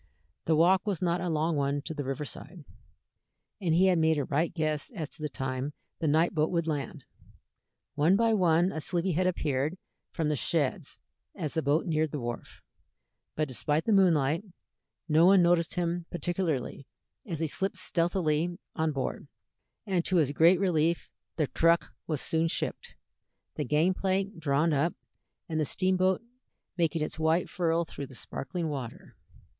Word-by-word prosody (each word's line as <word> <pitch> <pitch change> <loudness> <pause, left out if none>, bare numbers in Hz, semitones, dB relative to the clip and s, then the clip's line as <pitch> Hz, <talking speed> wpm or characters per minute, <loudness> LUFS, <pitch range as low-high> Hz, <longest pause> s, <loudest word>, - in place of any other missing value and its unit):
The 160 - +3
walk 185 +5 +4
was 195 -6 0
not 175 -1 0
a 180 - -2
long 160 +1 0
one 140 0 0
to 160 - -5
the 145 -2 -4
river 135 +3 -3
side, 160 +3 -9 1.0
and 165 -4 +2
he 185 +3 +5
had 185 -3 +4
made 160 -1 +3
a 145 - 0
right 155 +6 0
guess 155 -2 -1
as 155 -6 -4
to - - -10
the 150 - -2
time 130 +3 -3 0.3
the 165 - -1
night 160 +5 +3
boat 155 -2 +1
would 170 -2 0
land. 150 -1 -4 0.9
One 155 +6 +3
by 225 +1 +3
one 175 -2 +3
a 155 - -4
sleepy 175 +3 -1
head 180 +3 +1
appeared 150 -2 -1 0.3
from 160 -3 -1
the 150 - +1
sheds 145 0 -1 0.4
as 155 -3 -3
the 160 - 0
boat 150 +3 +1
neared 155 -2 +1
the 145 - -4
wharf, 120 -1 -6 0.7
but 155 0 0
despite 150 +4 -1
the - - +1
moonlight, 165 -5 +3 0.6
no 160 +2 +5
one 190 -1 +6
noticed 170 -1 +2
him 175 -1 -1
particularly 170 -7 -2 0.4
as 170 -5 -3
he 165 - 0
slipped 190 +5 -2
stealthily 175 -2 0 0.2
on 160 -1 +1
board, 135 -2 -3 0.6
and 185 -4 0
to 185 - 0
his 150 -5 +3
great 170 +5 +5
relief 170 -3 +1 0.2
the 155 - +1
truck 165 +4 +2
was 155 -4 -1
soon 165 0 +1
shipped, - - -3 0.6
the 150 - -2
gang 155 +8 +2
plank 195 0 -1
drawn 155 +1 +2
up, 150 +5 +1 0.5
and 160 -3 -2
the - - +2
steamboat 185 +4 +1 0.5
making 165 -2 +1
its 155 - -5
white 160 +2 +2
furrow 170 -1 0
through 140 -4 -7
the 130 - -13
sparkling 160 +8 -4
water. 135 -6 -6
160 Hz, 170 wpm, -29 LUFS, 150-175 Hz, 1.0 s, one